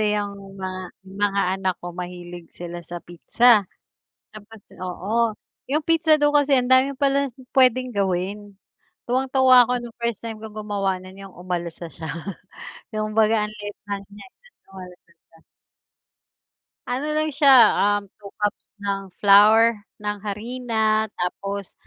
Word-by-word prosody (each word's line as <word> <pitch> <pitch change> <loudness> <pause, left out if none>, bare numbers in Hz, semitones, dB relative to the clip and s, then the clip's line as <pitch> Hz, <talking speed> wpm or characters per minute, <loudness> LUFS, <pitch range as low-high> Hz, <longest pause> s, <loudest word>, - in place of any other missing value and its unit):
Kasi 210 -1 +1
'yong 200 -1 -3 0.2
mga 185 -1 -6
mga 200 +1 -1 0.2
anak 190 -2 0
ko 175 - -5
mahilig 175 -1 -8
sila 175 0 -7
sa 175 0 -7
pizza 210 +4 +3 0.7
tapos 215 +1 -12 0.2
oo, 215 +6 -1 0.4
'yong 300 +1 0
pizza 320 -1 +4
dough 295 0 +2
kasi 290 -1 +3
ang 250 - -2
dami 260 +2 +4
pala 280 0 +2 0.3
puwedeng 255 -2 +3
gawin. 195 +1 -2 0.5
Tuwang-tuwa 260 0 +5
ako 250 - 0
nung 240 -1 -10
first 235 -3 -2
time 225 -1 -5
ko 220 - -8
gumawa 200 -3 -2
no'n 185 +1 -13
'yong 195 -2 -12
umalsa 175 -1 -5
siya 160 -1 -7 0.8
kumbaga 215 0 +2
ang - - -10
liit 205 -1 -8
lang 200 -1 -4
niya, 205 - -12
eh, - - -25 0.2
umalsa 180 -2 -13 0.2
siya. 165 - -23 1.5
Ano 265 +5 -2
lang 310 -1 0
siya, 270 -6 +7 0.2
um, 205 - -7 0.2
2 200 - -9
cups 205 0 -2
ng 200 -1 -3 0.2
flour, 215 +3 +6 0.2
ng 210 -1 -3
harina 220 0 -1
tapos, 195 +2 -4
210 Hz, 140 wpm, -23 LUFS, 190-245 Hz, 1.5 s, siya